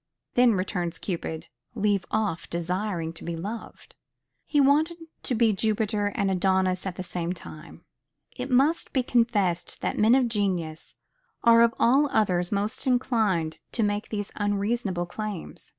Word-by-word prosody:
Then, 245 -3 +5
returns 180 -3 -2
Cupid, 165 -4 -4 0.3
leave 205 -4 +1
off 210 -6 -1
desiring 175 0 -2
to 165 - -9
be 170 - -3
loved. 210 +7 -7 0.5
He 295 - +2
wanted 300 +5 +3 0.2
to 250 - -1
be 225 -1 +3
Jupiter 210 0 0
and 200 -1 +1
Adonis 185 0 +1
at 180 - -4
the 185 - -5
same 175 -1 -3
time. 155 -3 -12 0.5
It 250 +1 -5
must 275 +6 +2
be 260 - +2
confessed 210 -8 +1
that - - -2
men 220 +4 +6
of 260 -2 +3
genius 185 -8 -2 0.5
are 230 -1 +7
of 235 0 +4
all 275 +5 +4
others 180 -6 +1
most 205 +6 -2
inclined 220 -10 +1
to 230 - +1
make 205 0 -1
these 205 -2 -4
unreasonable 205 -2 -1
claims. 205 0 -6
205 Hz, 150 wpm, -26 LUFS, 180-235 Hz, 0.5 s, are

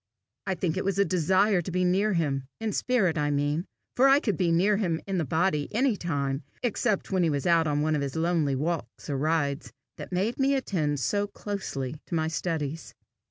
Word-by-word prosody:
I 190 - 0
think 170 -2 -1
it - - -1
was 195 -1 0
the 200 0 +3
desire 185 +2 +2
to 175 - -6
be 180 +1 +1
near 195 +4 +2
him 140 -6 -1
in 225 -1 -2
spirit, 195 -11 +1
I 145 0 +1
mean, 145 +4 0 0.3
for 265 +2 +5
I 275 +1 +6
could 210 - -1
be 170 +1 +1
near 195 +5 +3
him 170 -6 0
in 195 -2 -1
the 160 - 0
body 160 0 +1
any 255 -1 +3
time 140 -6 -2 0.2
except 220 -4 0
when 190 -1 +2
he 170 - +3
was 145 -2 -1
out 165 -2 +4
on 145 0 +1
one 155 0 +1
of 145 - -1
his 140 0 -3
lonely 160 -4 +1
walks 155 +1 -3
or 140 - -1
rides 150 -1 0 0.3
that - - -8
made 200 +8 -1
me 275 +1 +3
attend 155 - -1
so 205 +9 0
closely 155 -10 -5
to 170 - -3
my 160 -1 +1
studies. 160 -2 -3
170 Hz, 210 wpm, -27 LUFS, 150-200 Hz, 0.3 s, I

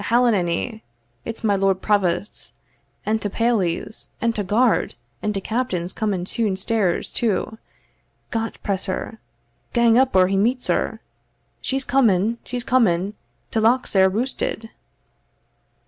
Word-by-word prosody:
Ahellanay! 220 -2 +1 0.4
it's 230 0 -6
my 205 -2 +3
lord 195 -1 +2
provosts, 200 -1 0 0.5
and 220 +1 0
ta 205 - -1
pailies, 215 -4 -1
and 230 0 +1
ta 210 - -1
guard 220 +5 +2 0.3
and 210 - 0
ta 200 - -2
captain's 190 -5 -2
coming 200 -5 -1
toon 205 -1 0
stairs 195 -3 0
too 220 -1 -1 0.7
Got 225 0 -2
press 195 -2 -2
her! 205 +3 -4 0.5
gang 235 0 +5
up 265 -3 +2
or 185 -1 +6
he 195 +1 0
meets 245 +5 +1
her. - - 0 0.6
She's 270 0 -1
coming 230 -4 +2
she's 245 -1 -4
coming 210 -7 +2 0.4
ta 225 - +1
lock's 240 +4 +3
sair 190 -1 +5
roosted." 225 +1 -2
215 Hz, 130 wpm, -22 LUFS, 190-235 Hz, 0.7 s, or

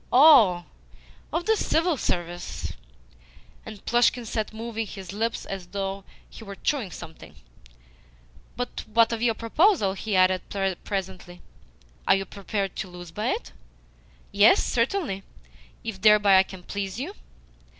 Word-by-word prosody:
"Oh! 245 - +7 0.7
Of 335 +3 -2
the 445 - +3
CIVIL 335 -4 +1
Service?" 175 -4 -3 0.9
And 215 -2 -10
Plushkin 240 0 +2
sat 220 -1 -3
moving 225 0 -4
his 190 -1 -8
lips 225 +3 -2
as 190 -2 -6
though 195 0 -4 0.2
he - - -12
were 200 -2 -8
chewing 255 -3 -1
something. 160 -2 -11 1.2
"Well, 245 0 -1 0.2
what 230 +1 +4
of 225 - -3
your 235 -2 +2
proposal?" 230 - +2
he 205 +1 -3
added 185 0 +4 0.4
presently. 185 -2 -5 0.6
"Are - - +6
you 195 0 -2
prepared 195 0 -4
to - - -3
lose 175 -2 -10
by 210 +5 -3
it?" - - -2 0.8
"Yes, 200 +2 +5
certainly, 240 - -1 0.6
if 215 -4 -6
thereby 210 -2 +6
I - - +5
can 185 -2 -10
please 200 +2 -4
you." 320 +10 -4
205 Hz, 135 wpm, -25 LUFS, 190-235 Hz, 1.2 s, Oh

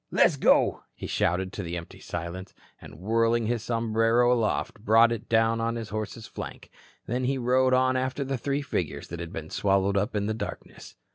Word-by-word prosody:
"Let's - - +4
go," - - +3
he - - -7
shouted 95 +2 0
to - - -4
the 85 -1 -4
empty 85 - -9
silence, 85 +3 -6 0.3
and - - -11
whirling 115 +4 +1
his 115 0 -1
sombrero 115 +1 +2
aloft, 115 -1 -1
brought 115 +1 +5
it 115 -2 -5
down 115 0 +3
on 115 +1 -1
his 115 -2 -5
horse's 110 +1 -5
flank. - - -8 0.3
Then 125 +2 -1
he 135 +1 0
rode 130 +1 +3
on 130 0 +3
after 130 +2 -1
the 135 0 -2
three 140 +3 -1
figures 140 - -3
that 85 - -6
had 85 -1 -6
been 80 -1 -7
swallowed 100 0 +1
up 100 +1 -1
in 100 -1 0
the 110 - -1
darkness. 110 - -8
115 Hz, 195 wpm, -27 LUFS, 100-120 Hz, 0.3 s, brought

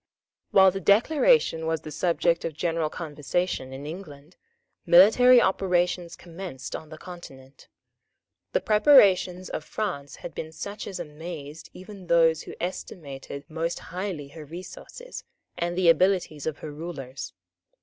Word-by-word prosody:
While 190 -1 +6
the 195 - -4
Declaration 220 - +3
was 160 0 -1
the 155 - -8
subject 170 0 +1
of 165 -3 -4
general 165 -1 -1
conversation 150 -2 -3
in 135 +2 -8
England, 155 -2 -9 0.5
military 230 +8 +7
operations 180 -3 0
recommenced 170 -7 -8
on 155 - -8
the 155 - -10
Continent. 140 -7 -12 0.9
The - - +2
preparations 200 -6 +5
of - - -4
France 155 -9 -4
had 175 - -9
been 160 - -6
such 200 +6 -6
as 190 -2 -6
amazed 155 -1 -8
even 190 -1 -11
those 165 -2 +4
who - - -9
estimated 140 -5 -6
most 165 +2 -3 0.2
highly 180 -6 -4
her 155 +2 -10
resources 180 - -9 0.3
and 175 +1 -2
the 185 -2 +2
abilities 170 -4 +2
of 155 -2 -2
her 155 - -6
rulers. 145 -4 -7
170 Hz, 135 wpm, -26 LUFS, 155-185 Hz, 0.9 s, military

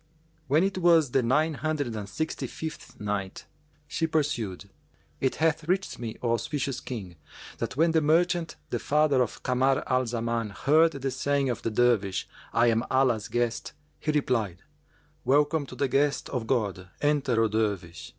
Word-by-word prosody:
When 150 +6 +4
it 195 -1 0
was 165 -6 +4
the 135 - +3
Nine 150 +7 +2
Hundred 145 -3 -2
and 105 -2 -5
Sixty 160 +10 -3
fifth 160 -1 -8
Night, 100 -2 -3 0.4
She 165 - -1
pursued, 115 - -1 0.5
It 130 - 0
hath 160 0 +1
reached 190 +2 -1
me, 115 -2 -5
O 120 - +1
auspicious 130 +2 -1
King, 95 -9 -7 0.4
that - - -3
when 165 +2 +4
the 160 -1 +3
merchant, 170 +2 +2 0.2
the - - 0
father 150 -3 +3
of 120 - -3
Kamar 130 +2 +2
al 130 -1 +1
Zaman, 115 -1 -1
heard 155 +9 +3
the 135 -1 -3
saying 135 +1 0
of 120 - -4
the - - -1
Dervish, 110 -4 +1 0.2
"I 115 - +3
am 115 -1 +3
Allah's 125 -5 +2
guest," 120 -1 -1 0.3
he 155 - 0
replied, 115 - 0 0.6
"Welcome 145 +2 +2
to 125 - -9
the 140 +3 0
guest 140 +2 +1
of 125 -4 -3
God: 100 -7 -1
enter, 145 -5 +2
O - - +3
Dervish!" 100 -7 -2
130 Hz, 165 wpm, -27 LUFS, 115-150 Hz, 0.6 s, When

